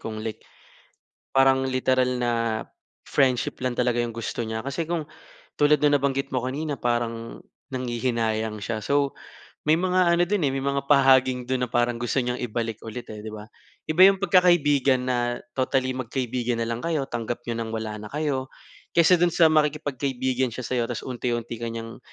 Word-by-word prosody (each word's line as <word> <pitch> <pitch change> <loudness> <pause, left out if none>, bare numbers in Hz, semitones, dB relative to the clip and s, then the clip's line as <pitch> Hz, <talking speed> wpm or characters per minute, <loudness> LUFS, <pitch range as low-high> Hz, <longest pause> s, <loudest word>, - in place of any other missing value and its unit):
kung 110 -1 -5
like 110 - -5 0.9
parang 135 0 +4
literal 130 -1 +1
na 120 -1 +1 0.8
friendship 130 -2 +1
lang 125 -1 -1
talaga 120 -1 +1
yung 120 - -3
gusto 115 +1 -4
niya. 110 0 -3
Kasi 140 +4 -2
kung 165 -3 -2 0.5
tulad 150 +1 +4
ng 145 -1 +5
nabanggit 135 0 -1
mo 130 - 0
kanina, 145 +1 -3
parang 115 -1 -2 0.3
nanghihinayang 115 -4 -2
siya. 110 +1 -2
So, 140 +5 0 0.5
may 155 +2 +4
mga 185 -1 +3
ano - - +3
dun 200 -4 0
eh, 135 - +2
may 135 - -2
mga 140 0 -1
pahaging 130 -2 +4
dun 130 -1 0
na - - -13
parang 120 0 +1
gusto 120 +3 -1
niyang 125 0 -1
ibalik 115 -2 -3
ulit, 120 +2 -7
eh, 105 -1 -8
'di 110 - -5
ba? 105 0 -9 0.4
Iba 155 +4 +3
yung 195 -1 +5
pagkakaibigan 150 -8 +4
na 120 -1 0 0.2
totally 130 0 +1
magkaibigan 125 -1 -2
na 115 - -1
lang 115 0 -3
kayo, 155 -5 -1
tanggap 120 0 -3
niyo 115 - -2
nang 115 -1 -4
wala 110 -1 -3
na 105 - -9
kayo, 140 -3 -2 0.4
kaysa 170 +2 +6
dun 175 0 +2
sa 165 -2 +6
makikipagkaibigan 135 -4 0
siya 130 - -5
sa 130 - -2
'yo, 120 - +2
tapos 120 -1 -4
unti-unti 120 -2 -3
ka 115 0 -4
niyang 115 0 -7
130 Hz, 180 wpm, -25 LUFS, 120-140 Hz, 0.9 s, kaysa